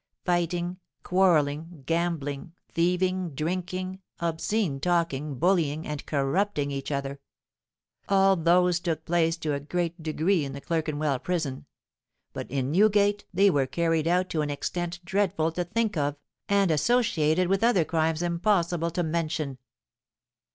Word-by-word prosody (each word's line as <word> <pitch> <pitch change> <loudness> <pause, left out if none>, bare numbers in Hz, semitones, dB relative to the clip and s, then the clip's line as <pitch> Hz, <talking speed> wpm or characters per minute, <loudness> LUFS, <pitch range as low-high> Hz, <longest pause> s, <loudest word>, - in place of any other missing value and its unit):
Fighting, 175 0 0 0.2
quarrelling, 165 -4 +1
gambling, 165 -2 -2 0.2
thieving, 180 -1 0
drinking, 185 +4 -3 0.2
obscene 170 -1 -1
talking, 155 -4 0
bullying, 160 -2 +1
and 150 -1 -4
corrupting 145 +2 0
each 140 +1 -4
other,—all 140 +7 -2
those 175 +1 +3
took 165 -2 -3
place 165 -1 +1
to 155 -3 -2
a 140 - -1
great 170 +3 -3
degree 160 +2 +1
in 135 -1 -5
the 140 - -6
Clerkenwell 155 -4 -1
Prison; 155 -7 -3 0.7
but - - -6
in 135 0 -1
Newgate 205 +2 +3
they 195 +2 +4
were 140 -4 +1
carried 165 +1 0
out 180 +2 +2
to 155 - 0
an 150 - -2
extent 175 +4 -3
dreadful 190 -4 +1
to 175 +2 -2
think 215 +3 -1
of, 145 -2 0 0.3
and 200 -3 +3
associated 175 - +2
with 195 +3 +1
other 205 -9 +4
crimes 160 0 0
impossible 170 -1 +1
to 175 +1 -1
mention. 155 -4 -2
170 Hz, 130 wpm, -27 LUFS, 150-180 Hz, 0.7 s, they